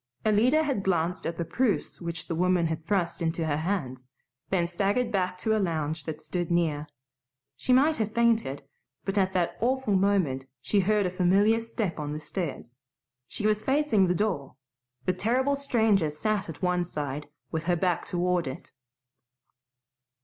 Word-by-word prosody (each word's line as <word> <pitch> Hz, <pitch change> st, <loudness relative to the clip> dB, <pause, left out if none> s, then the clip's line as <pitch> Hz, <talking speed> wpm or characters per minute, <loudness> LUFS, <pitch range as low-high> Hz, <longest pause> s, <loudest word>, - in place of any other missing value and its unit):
Alida 240 Hz, +9 st, +4 dB
had 275 Hz, -9 st, 0 dB
glanced 180 Hz, -2 st, 0 dB
at 165 Hz, 0 st, -4 dB
the 170 Hz, -, -2 dB
proofs 215 Hz, +5 st, -1 dB
which 170 Hz, 0 st, -5 dB
the 170 Hz, -, -2 dB
woman 180 Hz, +1 st, +2 dB
had 160 Hz, -1 st, -2 dB
thrust 175 Hz, -3 st, 0 dB
into 165 Hz, 0 st, 0 dB
her 145 Hz, -2 st, 0 dB
hands, 135 Hz, -8 st, -3 dB, 0.4 s
then 180 Hz, -3 st, +2 dB
staggered 200 Hz, +7 st, 0 dB
back 185 Hz, -3 st, 0 dB
to 220 Hz, +4 st, +1 dB
a -, -, +2 dB
lounge 160 Hz, -4 st, -2 dB
that 155 Hz, -2 st, -6 dB
stood 175 Hz, -2 st, -3 dB
near. 160 Hz, -4 st, +1 dB, 0.7 s
She -, -, -2 dB
might 290 Hz, +5 st, +5 dB
have 220 Hz, -1 st, -1 dB
fainted, 225 Hz, -, +1 dB, 0.4 s
but 195 Hz, -, -2 dB
at 190 Hz, -1 st, +1 dB
that 175 Hz, -2 st, 0 dB
awful 255 Hz, -3 st, +1 dB
moment 185 Hz, -10 st, +1 dB
she 200 Hz, +10 st, +1 dB
heard 205 Hz, +1 st, +2 dB
a 180 Hz, -, -1 dB
familiar 195 Hz, +5 st, +3 dB
step 225 Hz, -7 st, -3 dB
on 150 Hz, 0 st, -3 dB
the 150 Hz, -, -4 dB
stairs. 150 Hz, -8 st, -5 dB, 0.5 s
She 210 Hz, -, -5 dB
was 215 Hz, 0 st, +2 dB
facing 265 Hz, -7 st, +3 dB
the 180 Hz, -, +1 dB
door; 170 Hz, -11 st, -1 dB, 0.5 s
the 185 Hz, -, +2 dB
terrible 255 Hz, +9 st, +1 dB
stranger 220 Hz, -, +2 dB
sat 195 Hz, +6 st, -1 dB
at 165 Hz, +3 st, -8 dB
one 180 Hz, -1 st, +2 dB
side, 145 Hz, -3 st, -4 dB, 0.2 s
with 160 Hz, 0 st, -3 dB
her 175 Hz, 0 st, +2 dB
back 175 Hz, 0 st, 0 dB
toward 180 Hz, -2 st, 0 dB
it. 130 Hz, -, -7 dB
180 Hz, 170 wpm, -27 LUFS, 160-215 Hz, 0.7 s, might